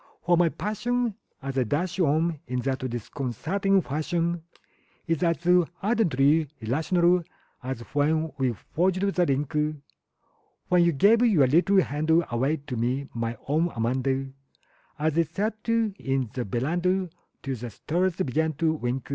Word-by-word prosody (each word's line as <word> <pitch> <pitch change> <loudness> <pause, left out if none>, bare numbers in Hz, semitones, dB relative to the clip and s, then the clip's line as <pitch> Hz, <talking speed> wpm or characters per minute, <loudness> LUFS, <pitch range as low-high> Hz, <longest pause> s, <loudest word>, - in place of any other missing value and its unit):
For 175 0 +4
my 170 -1 +4
passion 235 +5 -1 0.3
as 135 -1 -2
I - - +3
dash 170 - -2
on 160 0 +2
in 125 0 -2
that 135 +1 -1
disconcerting 155 - -1
fashion 165 +4 -1 0.6
Is 165 -3 -1
as 170 -2 +2 0.5
ardently 160 - +3
irrational 170 - +2 0.4
as 130 -1 -5
when 155 +2 +1
we 130 -2 +2
forged 185 - -1
the 195 -3 +2
link 140 +1 -1 1.1
When 180 -1 +5
you 170 - +4
gave 205 - +4
your 195 - +5
little 180 +8 +4
hand 150 +2 -3 0.2
away 135 +7 +1
to 130 - -4
me, 125 +4 -1
my 115 0 -3
own 160 +5 +2
Amanda 130 +3 -1 0.7
An 155 0 0
we 165 - +3
sat 210 +8 -4
'n 225 -3 +1 0.4
the 125 - -3
veranda 175 - 0 0.4
till 135 -1 -2
the 120 +1 -6
stars 175 - -1
began 160 -1 0
to 160 +2 +1
wink. 125 -3 -3
160 Hz, 140 wpm, -26 LUFS, 135-180 Hz, 1.1 s, When